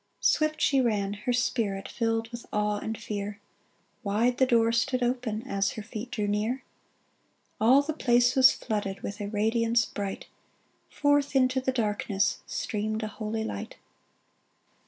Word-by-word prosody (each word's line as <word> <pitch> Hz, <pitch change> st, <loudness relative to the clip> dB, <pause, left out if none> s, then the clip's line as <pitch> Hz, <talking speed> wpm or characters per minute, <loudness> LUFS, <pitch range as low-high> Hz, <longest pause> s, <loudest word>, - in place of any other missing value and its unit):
" -, -, -45 dB
Swift 310 Hz, 0 st, +2 dB
she 275 Hz, -2 st, +3 dB
ran, 205 Hz, -5 st, 0 dB
her 210 Hz, +4 st, -3 dB
spirit 225 Hz, -5 st, 0 dB
Filled 225 Hz, -1 st, -1 dB
with 235 Hz, 0 st, -9 dB
awe 210 Hz, 0 st, 0 dB
and 220 Hz, +1 st, -4 dB
fear; 205 Hz, 0 st, -5 dB, 0.6 s
Wide 235 Hz, +4 st, +1 dB
the 260 Hz, -, +5 dB
door 230 Hz, -2 st, +4 dB
stood 250 Hz, +2 st, +1 dB
open 240 Hz, -3 st, -1 dB
As 200 Hz, -6 st, -1 dB
her 215 Hz, -, -6 dB
feet 225 Hz, +2 st, -7 dB
drew 215 Hz, -4 st, -2 dB
near! 215 Hz, +6 st, -1 dB, 1.0 s
All 255 Hz, +6 st, +5 dB
the 315 Hz, +2 st, -3 dB
place 245 Hz, -3 st, +3 dB
was 260 Hz, -1 st, +8 dB
flooded 205 Hz, -3 st, -3 dB
With 205 Hz, +2 st, -6 dB
a 205 Hz, -, -3 dB
radiance 225 Hz, +2 st, +2 dB
bright; 200 Hz, -2 st, -5 dB, 0.6 s
Forth 290 Hz, -1 st, +1 dB
into 260 Hz, 0 st, +3 dB
the 260 Hz, -, 0 dB
darkness 210 Hz, -4 st, 0 dB
Streamed 215 Hz, +1 st, -2 dB
a -, -, -1 dB
holy 220 Hz, +1 st, -3 dB
light. 100 Hz, -, -5 dB
225 Hz, 155 wpm, -28 LUFS, 210-250 Hz, 1.0 s, was